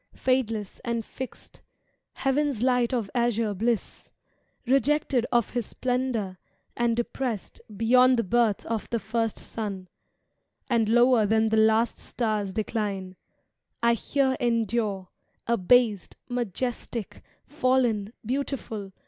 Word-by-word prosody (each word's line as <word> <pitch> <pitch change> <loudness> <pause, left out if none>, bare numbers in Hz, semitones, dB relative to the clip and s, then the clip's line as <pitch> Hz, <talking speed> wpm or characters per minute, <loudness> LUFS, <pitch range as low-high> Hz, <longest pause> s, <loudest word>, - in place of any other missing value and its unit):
Fadeless 225 -6 -1
and 235 -2 -2
fixed, 260 -1 -9 0.5
heavVs 270 -3 0
light 250 -2 +2
of 235 -5 -1
azure 230 -3 +1
bliss; 225 +3 -2 0.6
Rejected 275 -1 +2
of 240 -3 +2
His 240 -4 -2
splendour, 245 -7 -2 0.4
and 235 -1 +1
depressed 240 -2 -3 0.2
Beyond 250 +3 +5
the 230 - +2
birth 225 0 +1
of 225 -2 -3
the 235 - 0
first 225 +1 -2
sun, 195 -5 -5 0.8
and 230 -4 +2
lower 240 -1 +5
Than 220 +1 +3
the 220 - +2
last 220 +2 +3
star's 215 -4 -2
decline, 200 -3 -3 0.7
I 235 0 +5
here 265 +3 +1
endure. 225 -5 0 0.4
Abased, 230 -1 +2
majestic, 240 -1 -3 0.2
fallen, 255 -7 +1
beautiful. 235 -6 -3
235 Hz, 110 wpm, -26 LUFS, 215-250 Hz, 0.8 s, Beyond